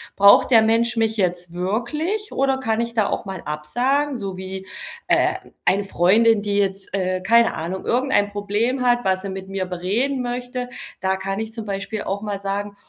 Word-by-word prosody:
Braucht 200 +5 +6
der 225 -2 +8
Mensch 230 +2 +2
mich 225 0 +1
jetzt 175 -2 -1
wirklich 275 - -2
oder 270 0 +1
kann 225 -3 0
ich 235 0 -3
da 215 -3 +2
auch - - -2
mal 195 -1 -6
absagen?“ 250 - 0
So 195 -3 -5
wie, 190 0 -6 0.4
äh, - - +3 0.3
eine 200 +2 +3
Freundin, 205 +4 +3
die 205 -1 -1
jetzt, 195 -1 0
äh, 185 -1 -1
keine 230 +4 +4
Ahnung, 175 +4 -5
irgendein 245 -5 +2
Problem 210 +6 -1
hat, 245 -2 +2
was 185 0 +2
sie 195 - -5
mit 190 0 -7
mir 195 -1 -2
bereden 210 +10 -1
möchte. 245 0 -4 0.3
Da 190 0 0
kann 195 +1 -3
ich 220 0 -5
zum 225 -2 -6
Beispiel 200 +2 -3
auch 200 +1 -3
mal 205 -2 -3
sagen: 200 +1 -3
205 Hz, 185 wpm, -22 LUFS, 190-235 Hz, 0.4 s, der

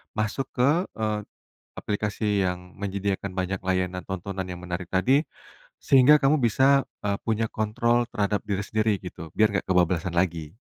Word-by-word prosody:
masuk 110 +4 -1
ke, 150 +9 +2
eee, 110 -1 -1 0.6
aplikasi 105 -1 -1
yang 90 0 -5
menyediakan 100 0 -2
banyak 95 +1 -2
layanan 90 -1 -1
tontonan 95 0 -4
yang 90 - -6
menarik 90 0 -4
tadi, 130 +10 +3 0.6
sehingga 135 +2 +7
kamu 145 +3 +4
bisa, 135 +3 +3 0.2
eee, 100 -1 -1
punya 110 0 0
kontrol 120 +2 +1
terhadap 105 -3 -1
diri 100 -1 -1
sendiri 110 +1 +1
gitu, 85 -3 -9
biar 110 -1 +4
nggak 95 -3 -2
kebablasan 90 -1 +1
lagi? 85 -1 -1
100 Hz, 145 wpm, -25 LUFS, 90-115 Hz, 0.6 s, sehingga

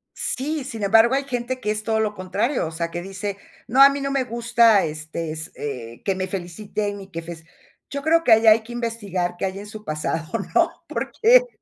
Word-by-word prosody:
Sí, 295 +2 -1
sin 225 -5 -6
embargo, 225 +5 +5
hay 275 - 0
gente 255 -1 -3
que 210 - -1
es 215 0 -2
todo 220 0 0
lo 215 -1 0
contrario, 185 - -1
o - - -6
sea, 170 +1 -3
que 175 - -4
dice: 195 +1 -5 0.3
"No, 260 +4 +4
a 275 - +10
mí 280 0 -3
no 275 0 -2
me 270 -1 +1
gusta, 235 -3 +3
este 155 +1 -5
s 160 +1 -5
eh, 120 -5 -6
que 195 - +2
me 185 0 -2
feliciten 200 +2 -4
y 190 - -11
que 165 0 -5
fes". 165 -1 -8 0.5
Yo 280 0 -4
creo 330 +1 +3
que 240 - +3
ahí 225 +1 +6
hay 220 +1 +7
que 240 +2 -10
investigar 205 -7 -2
qué - - -2
hay 190 +1 -4
en 205 - -8
su 215 0 -9
pasado, 155 0 -2 0.3
¿no? - - +4 0.2
Porque - - +3
215 Hz, 220 wpm, -23 LUFS, 175-240 Hz, 0.5 s, a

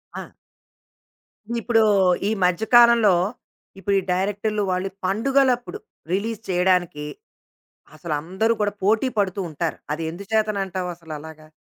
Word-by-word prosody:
ఆ! - - -6 1.3
ఇప్పుడు 225 -1 +3 0.5
ఈ - - 0
మధ్య 180 +3 +2
కాలంలో 235 -4 +7 0.7
ఇప్పుడు 200 +1 0
ఈ - - -3
డైరెక్టర్లు 205 +3 -1
వాళ్ళు 185 +1 -1 0.2
పండుగలప్పుడు 255 - +1 0.3
రిలీజ్ 220 +3 -2
చేయడానికి 180 -4 +1 0.9
అసలందరూ 175 +8 -1
కూడా 205 -1 0
పోటీ 220 +6 +3
పడుతూ 200 -2 0
ఉంటారు. 160 +1 -3 0.2
అది 160 +2 -4
ఎందు 185 +4 -8
చేతనంటావసలలాగా? 175 -7 -3
195 Hz, 105 wpm, -23 LUFS, 175-220 Hz, 1.3 s, కాలంలో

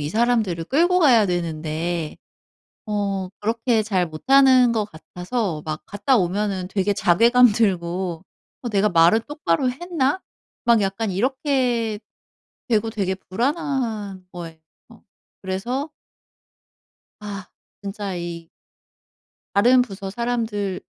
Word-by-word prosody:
이 145 - -2
사람들을 215 -5 +1
끌고 345 - +3
가야 245 - +5
되는데 165 -2 -2 0.7
어 200 -3 -2
그렇게 230 +1 +1
잘 190 -4 0
못하는 255 - +5
것 220 -3 0
같아서 180 +1 -4
막 155 0 -4
갔다 205 +6 +1
오면은 190 -1 -1
되게 200 +1 0
자괴감 230 +6 +5
들고 185 -4 -1 0.4
'어 240 - -4
내가 205 0 +2
말을 175 +4 +5
똑바로 255 - -1
했나?' 320 +2 -1 0.4
막 235 -2 +4
약간 200 +2 -1
이렇게 245 -1 0 0.7
되고 225 -1 +1
되게 195 -4 -1
불안한 225 - -3
거예요. 170 -2 -8 0.9
그래서 240 +11 -3 1.3
아 205 -1 -7 0.3
진짜 200 -1 -5
이 170 -1 -6 1.0
다른 245 +5 +5
부서 195 -4 -5
사람들 220 -4 -2
205 Hz, 220 characters per minute, -22 LUFS, 185-245 Hz, 1.3 s, 가야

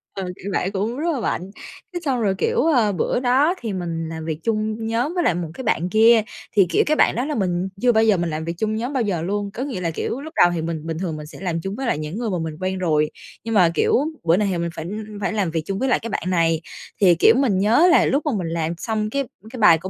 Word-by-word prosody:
ờ, 195 - -3
cãi - - -14 0.2
vã 190 - 0
cũng 215 +6 -2
rất 335 +4 0
là 265 - -2
mạnh. 195 -3 -3 0.4
Thế 350 - -2
xong 255 -4 0
rồi, 195 -3 +1
kiểu, 465 - +1
ờ, 245 -10 +3
bữa 195 - 0
đó 265 +7 +3
thì 225 -5 -3
mình 165 -3 -3
làm 160 -1 -6
việc 160 -1 -3
chung 220 0 -1
nhóm 240 +9 0
với 350 -2 0
lại 175 - +2
một 175 -1 -3
cái 260 - -7
bạn 180 -5 0
kia 225 +2 +6 0.3
thì, 195 - +6
kiểu, - - +3
cái 305 - +2
bạn - - +3
đó 245 +3 -1
là 300 0 -2
mình 185 -1 -1
chưa 250 -1 +5
bao 220 -1 +3
giờ 210 -4 +4
mình 170 0 -1
làm 160 +1 -4
việc 170 - -2
chung 215 +3 -1
nhóm 240 +5 -3
bao 260 -4 +1
giờ 185 -6 -1
luôn. 200 +3 -2
Có 255 - -4
nghĩa 250 -10 -4
là, 165 -1 -1
kiểu, 240 - -3
lúc 315 +2 -9
đầu 175 - +5
thì 165 - -2
mình 160 -1 -4
bình 160 - -3
thường 165 -5 -3
mình 150 - -8
sẽ - - -12
làm 170 -3 -2
chung 195 +3 -4
với 265 +2 -4
lại 230 - +1
những 155 +6 -5
người 235 -2 -2
mà 185 - -1
mình 160 -1 -4
quen 185 0 -2
rồi 155 -4 +1 0.3
nhưng 230 - -3
mà, 180 -6 +5
kiểu, - - +1 0.3
bữa 170 +2 +3
này 210 - +1
thì 180 - -1
mình 170 0 -2
phải 160 - -6 0.4
phải 205 - -1
làm 195 -6 0
việc 160 - -1
chung 195 +2 -3
với 265 +2 0
lại - - +3
cái 230 - -6
bạn - - -3
này. 165 -3 +2 0.4
Thì, 180 -3 +6
kiểu, 220 +7 +6
mình 245 -9 +2
nhớ 235 - +5
là - - +5
lúc 280 +3 0
mà 300 - +1
mình 180 - -3
làm 165 0 -2
xong 215 +1 -2
cái 275 +3 -1 0.3
cái 250 - -9
bài 170 -6 +7
của 185 +4 -7
200 Hz, 295 wpm, -22 LUFS, 170-235 Hz, 0.4 s, bài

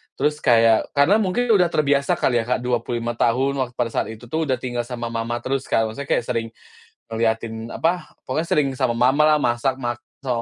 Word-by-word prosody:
Terus 150 +2 0
kayak 115 -1 +3
karena 155 +9 +4
mungkin 220 +4 0
udah 185 -4 +5
terbiasa 140 -3 +2
kali 120 -2 +1
ya, - - -12
Kak 125 - +1
25 120 -1 -2
tahun 135 +4 +1
wak 130 -2 -1
pada 120 -1 -1
saat - - -1
itu 110 +2 -12
tuh 160 +2 -1
udah 130 -2 +1
tinggal 120 -2 -3
sama 120 -2 -5
mama 115 +1 -3
terus 135 +1 -2
kan, 115 - +1
maksudnya 140 +5 -6
kayak - - +1
sering 115 -2 -1 0.6
ngeliatin, 115 0 -1
apa, 175 +2 0 0.2
pokoknya 155 +6 -1
sering 150 -4 +2
sama 125 -3 +1
mamalah, 150 +5 +4
masak 120 +2 +1
mak 120 0 -2 0.3
sama 120 -3 -1
125 Hz, 195 wpm, -22 LUFS, 115-140 Hz, 0.6 s, udah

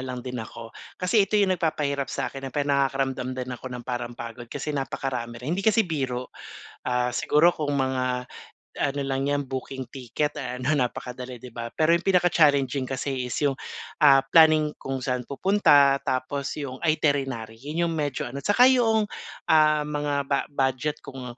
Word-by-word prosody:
lang 125 -1 -6
din 125 -2 -4
ako. 115 +1 -9 0.2
Kasi 195 +2 +2
ito 210 - +1
'yong 195 -2 +3
nagpapahirap 140 -4 -1
sa'kin 135 - -4
na 135 - -5
pe 145 +2 -1
nakakaramdam 135 -2 0
din 125 0 -4
ako 125 - -8
ng 125 -1 -7
parang 120 -1 -4
pagod 120 0 -8
kasi 150 - -4
napakarami 130 -4 -3
rin, 155 - -1
hindi 190 - -1
kasi 220 +1 +3
biro. 130 -6 -3 0.6
Ah, 125 0 0
siguro 160 +7 +4
kung 145 -2 -2
mga 130 -2 0 0.5
ano 140 0 -1
lang 135 +1 -1
yan 145 -1 0
booking 130 0 -5
ticket 135 +3 -2
ano 125 0 -2
napakadali, 125 -1 -3
'di 125 +2 -11
ba? 115 0 -5
Pero 160 +1 +3
'yong 170 - +2
pinaka-challenging 145 -8 +3
kasi 130 -1 -3
is - - -3
'yong, 140 - +2 0.5
ah, 135 -2 +7
planning 155 0 +5
kung 135 0 -3
saan 125 -1 -1
pupunta, 145 -5 +4
tapos 135 +2 -2
'yong 135 -3 -6
iterinary. 135 -8 0
'Yon 160 +4 -1
'yong 165 - -1
medyo 145 -4 -2
ano, 135 +3 -6
tsaka 240 +5 +5
yong, 225 -4 +4 0.4
um, 155 -2 +4
mga 150 -1 -2
bu-budget 140 0 -1
kung 125 -2 -8
135 Hz, 165 wpm, -25 LUFS, 125-150 Hz, 0.6 s, ah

